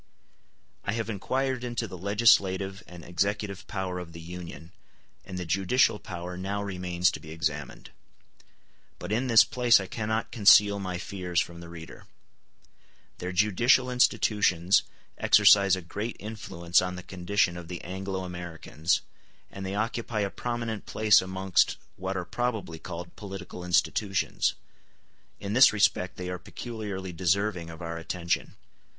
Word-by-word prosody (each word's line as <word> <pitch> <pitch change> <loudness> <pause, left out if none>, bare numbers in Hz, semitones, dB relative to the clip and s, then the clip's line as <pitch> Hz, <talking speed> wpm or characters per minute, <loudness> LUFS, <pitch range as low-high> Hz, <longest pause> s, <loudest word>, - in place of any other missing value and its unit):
I 100 - -1
have 115 0 -2
inquired 130 +5 -1
into 120 -2 -3
the 95 - -8
legislative 95 -1 +2
and 85 -2 -11
executive 100 +2 -2
power 95 -2 -3
of 85 -2 -9
the 85 - -9
Union, 85 0 -9 0.5
and 95 - -7
the 90 - -4
judicial 100 - +2
power 90 +1 -7
now 100 +3 -3
remains 90 -2 0
to - - -6
be 80 - -12
examined; 75 -2 -4 1.1
but 90 - -7
in 120 +5 0
this 115 -3 +8
place 125 -5 +4
I 95 - -4
cannot 110 +2 -2
conceal 100 -2 +6
my 90 -2 -3
fears 90 -2 -2
from 85 -1 -3
the 85 -1 -10
reader. 85 -1 -11 1.1
Their 90 +1 -4
judicial 110 +7 +3
institutions 100 -7 +3 0.4
exercise 100 -2 +6
a 95 - -7
great 105 +7 -5
influence 95 -5 0
on 90 0 -3
the 90 - -8
condition 90 0 0
of 85 -1 -8
the 90 0 -7
Anglo 95 +1 -4
Americans, 85 -2 -2 0.5
and 95 - -7
they 95 +1 -3
occupy 115 0 -2
a 100 -1 -1
prominent 120 -3 -4
place 110 -1 +5
amongst 95 -1 +1 0.2
what 95 +1 -3
are 90 - -3
probably 110 -10 -3
called 85 0 -8
political 95 -3 -8
institutions: 95 +2 +1 0.8
in 100 +1 -4
this 130 +3 +8
respect 95 -3 +1
they 90 - -5
are 90 -1 -4
peculiarly 100 -2 -6
deserving 90 0 0
of 80 +1 -9
our 85 0 -4
attention. 85 +1 -2
95 Hz, 145 wpm, -28 LUFS, 90-105 Hz, 1.1 s, this